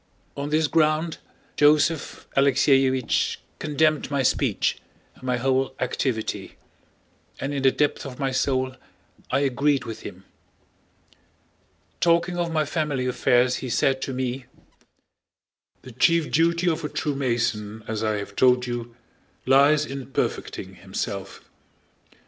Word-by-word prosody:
On 140 Hz, +1 st, -4 dB
this 155 Hz, +1 st, +2 dB
ground 155 Hz, +1 st, +1 dB, 0.4 s
Joseph 150 Hz, +1 st, +2 dB
Alexéevich 135 Hz, -2 st, +3 dB, 0.2 s
condemned 155 Hz, 0 st, +1 dB
my 140 Hz, -2 st, 0 dB
speech -, -, +1 dB, 0.4 s
and -, -, -22 dB
my 125 Hz, -1 st, -1 dB
whole 130 Hz, +1 st, 0 dB
activity, 125 Hz, -2 st, -2 dB, 0.8 s
and 140 Hz, +2 st, -3 dB
in 140 Hz, -, -2 dB
the 135 Hz, -, +5 dB
depth 145 Hz, +2 st, 0 dB
of 130 Hz, -3 st, -8 dB
my 135 Hz, -2 st, -1 dB
soul 130 Hz, 0 st, 0 dB, 0.5 s
I -, -, +1 dB
agreed 140 Hz, +1 st, +1 dB
with 115 Hz, -, -7 dB
him. 95 Hz, 0 st, -10 dB, 1.7 s
Talking 170 Hz, +1 st, +2 dB
of 170 Hz, -1 st, -1 dB
my 155 Hz, -1 st, +1 dB
family 145 Hz, -4 st, -1 dB
affairs 125 Hz, 0 st, +2 dB
he 130 Hz, -, -5 dB
said 135 Hz, +3 st, +1 dB
to 135 Hz, -, -3 dB
me, 130 Hz, 0 st, -3 dB, 1.4 s
"the 130 Hz, -, -10 dB
chief 165 Hz, +6 st, +2 dB
duty 170 Hz, +2 st, +2 dB
of 165 Hz, -1 st, 0 dB
a 150 Hz, -, -2 dB
true 150 Hz, -1 st, -2 dB
Mason, 115 Hz, -5 st, -2 dB
as 110 Hz, -1 st, -3 dB
I 110 Hz, -1 st, 0 dB
have 100 Hz, 0 st, -7 dB
told 125 Hz, -1 st, +4 dB
you, 120 Hz, -1 st, -5 dB, 0.5 s
lies 145 Hz, +3 st, +5 dB
in 135 Hz, -2 st, -7 dB
perfecting 135 Hz, -, -3 dB
himself. -, -, -5 dB
135 Hz, 130 wpm, -24 LUFS, 125-150 Hz, 1.7 s, the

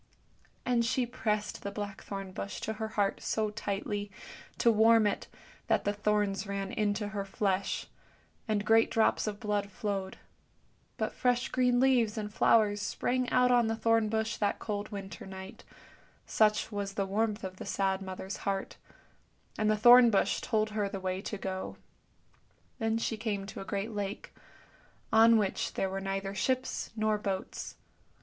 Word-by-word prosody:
And 240 Hz, -2 st, +2 dB
she 250 Hz, +2 st, +1 dB
pressed 215 Hz, -4 st, -2 dB
the 200 Hz, -, -4 dB
blackthorn 200 Hz, -1 st, -6 dB
bush 195 Hz, +2 st, -5 dB
to 220 Hz, -, -2 dB
her 220 Hz, 0 st, -4 dB
heart 205 Hz, -2 st, 0 dB
so 215 Hz, -1 st, -1 dB
tightly, 205 Hz, -1 st, -3 dB, 0.5 s
to 235 Hz, -, +4 dB
warm 225 Hz, 0 st, +5 dB
it, 205 Hz, -, -1 dB, 0.4 s
that -, -, +2 dB
the 205 Hz, -, 0 dB
thorns 205 Hz, -1 st, 0 dB
ran 195 Hz, 0 st, -3 dB
into 210 Hz, 0 st, -1 dB
her 205 Hz, -1 st, -3 dB
flesh, 195 Hz, 0 st, -1 dB, 0.6 s
and 210 Hz, -2 st, 0 dB
great 225 Hz, +1 st, +5 dB
drops 220 Hz, -1 st, +2 dB
of 205 Hz, -1 st, -3 dB
blood 205 Hz, -2 st, -1 dB
flowed; 195 Hz, -1 st, -3 dB, 0.8 s
but -, -, -2 dB
fresh 245 Hz, 0 st, +1 dB
green 250 Hz, -1 st, +2 dB
leaves 245 Hz, -5 st, +3 dB
and 210 Hz, -1 st, -4 dB
flowers 210 Hz, -2 st, +4 dB
sprang 250 Hz, +4 st, -1 dB
out 250 Hz, 0 st, +4 dB
on 240 Hz, -2 st, +4 dB
the 225 Hz, -, 0 dB
thorn 225 Hz, -1 st, +2 dB
bush 220 Hz, +1 st, -1 dB
that 205 Hz, -1 st, 0 dB
cold 205 Hz, -1 st, -4 dB
winter 195 Hz, -2 st, -7 dB
night, 190 Hz, +3 st, -9 dB, 0.6 s
such 215 Hz, 0 st, +2 dB
was 200 Hz, -1 st, -4 dB
the 195 Hz, -, 0 dB
warmth 210 Hz, +2 st, -1 dB
of 185 Hz, 0 st, -7 dB
a -, -, -5 dB
sad 195 Hz, -1 st, 0 dB
mother's 190 Hz, +1 st, -6 dB
heart, 195 Hz, -1 st, -3 dB, 0.8 s
and 215 Hz, 0 st, +1 dB
the 215 Hz, -, +3 dB
thorn 240 Hz, +2 st, +8 dB
bush 205 Hz, -, +1 dB
told 215 Hz, -2 st, 0 dB
her 210 Hz, -2 st, -1 dB
the 195 Hz, -1 st, -5 dB
way 185 Hz, 0 st, -2 dB
to 210 Hz, -, -5 dB
go. 190 Hz, -1 st, -5 dB, 1.0 s
Then 225 Hz, 0 st, +1 dB
she 225 Hz, -1 st, -2 dB
came 210 Hz, -3 st, -2 dB
to 200 Hz, -, -7 dB
a -, -, -7 dB
great 200 Hz, +3 st, -3 dB
lake, 205 Hz, 0 st, -5 dB, 0.8 s
on 225 Hz, +1 st, +7 dB
which 205 Hz, -3 st, -1 dB
there 190 Hz, -, -1 dB
were 195 Hz, 0 st, -3 dB
neither 195 Hz, 0 st, -3 dB
ships 255 Hz, +5 st, -1 dB
nor 215 Hz, -1 st, +1 dB
boats. 195 Hz, -2 st, -4 dB
210 Hz, 165 wpm, -30 LUFS, 195-225 Hz, 1.0 s, thorn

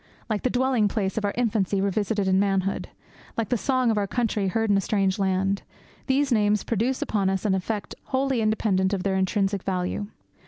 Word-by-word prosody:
Like 210 Hz, -, 0 dB
the 255 Hz, -, +1 dB
dwelling 250 Hz, -3 st, +2 dB
place 195 Hz, -2 st, -1 dB
of 220 Hz, -, -1 dB
our 200 Hz, -, 0 dB
infancy 210 Hz, -5 st, +1 dB
revisited 200 Hz, +1 st, 0 dB
in 190 Hz, 0 st, +3 dB
manhood, 195 Hz, -1 st, 0 dB, 0.5 s
like 230 Hz, -2 st, -1 dB
the 250 Hz, -, +2 dB
song 255 Hz, 0 st, +1 dB
of 215 Hz, -, +1 dB
our 200 Hz, -, -1 dB
country 215 Hz, -3 st, 0 dB
heard 225 Hz, +3 st, +1 dB
in -, -, +4 dB
a -, -, +2 dB
strange 195 Hz, 0 st, 0 dB
land, 195 Hz, +1 st, +1 dB, 0.5 s
these 275 Hz, +1 st, +2 dB
names 210 Hz, -2 st, +2 dB
produce 235 Hz, +4 st, 0 dB
upon 200 Hz, -3 st, 0 dB
us 190 Hz, +1 st, -2 dB
an 200 Hz, -, +2 dB
effect 200 Hz, +3 st, -2 dB
wholly 265 Hz, -2 st, 0 dB
independent 205 Hz, -3 st, +1 dB
of 190 Hz, -2 st, -1 dB
their 195 Hz, -1 st, 0 dB
intrinsic 195 Hz, +1 st, 0 dB
value. 185 Hz, +2 st, -2 dB
205 Hz, 195 wpm, -25 LUFS, 195-225 Hz, 0.5 s, in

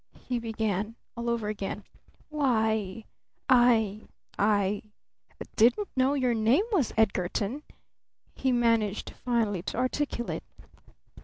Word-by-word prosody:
he 245 Hz, -1 st, -3 dB
began 220 Hz, -2 st, -2 dB, 0.2 s
all 235 Hz, 0 st, -3 dB
over 235 Hz, -3 st, -1 dB
again. 205 Hz, -1 st, -4 dB, 0.5 s
"Why 220 Hz, -8 st, 0 dB, 0.4 s
I 230 Hz, -5 st, +4 dB, 0.4 s
I 205 Hz, -1 st, +2 dB, 0.7 s
didn't 245 Hz, -, +3 dB
know 265 Hz, +2 st, +3 dB
your 255 Hz, -3 st, +1 dB
name 230 Hz, -, +3 dB
was 325 Hz, -, +2 dB
Edgarton!" 205 Hz, +4 st, 0 dB, 0.7 s
he 265 Hz, -, 0 dB
managed 230 Hz, -4 st, +1 dB
finally 225 Hz, -7 st, -1 dB
to 185 Hz, -, -5 dB
articulate. 255 Hz, -1 st, -1 dB
230 Hz, 100 wpm, -28 LUFS, 210-250 Hz, 0.7 s, I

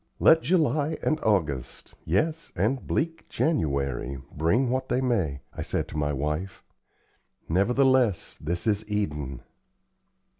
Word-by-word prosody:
"Let 160 Hz, 0 st, +6 dB
July 155 Hz, -3 st, +1 dB
and 155 Hz, -, +1 dB
August 80 Hz, -, -1 dB
yes, 155 Hz, -, 0 dB
and 115 Hz, +9 st, 0 dB
bleak 165 Hz, +1 st, -2 dB
January 70 Hz, -, 0 dB
bring 110 Hz, -, +1 dB
what 130 Hz, 0 st, -1 dB
they 125 Hz, -, +2 dB
may," 95 Hz, -, 0 dB
I -, -, -6 dB
said -, -, -2 dB
to -, -, -9 dB
my 75 Hz, 0 st, 0 dB
wife, 75 Hz, +6 st, -3 dB, 0.8 s
"nevertheless, 125 Hz, +3 st, +2 dB
this 85 Hz, +3 st, -2 dB
is 105 Hz, -1 st, +1 dB
Eden." 75 Hz, -11 st, -2 dB
100 Hz, 120 wpm, -27 LUFS, -, 0.8 s, Let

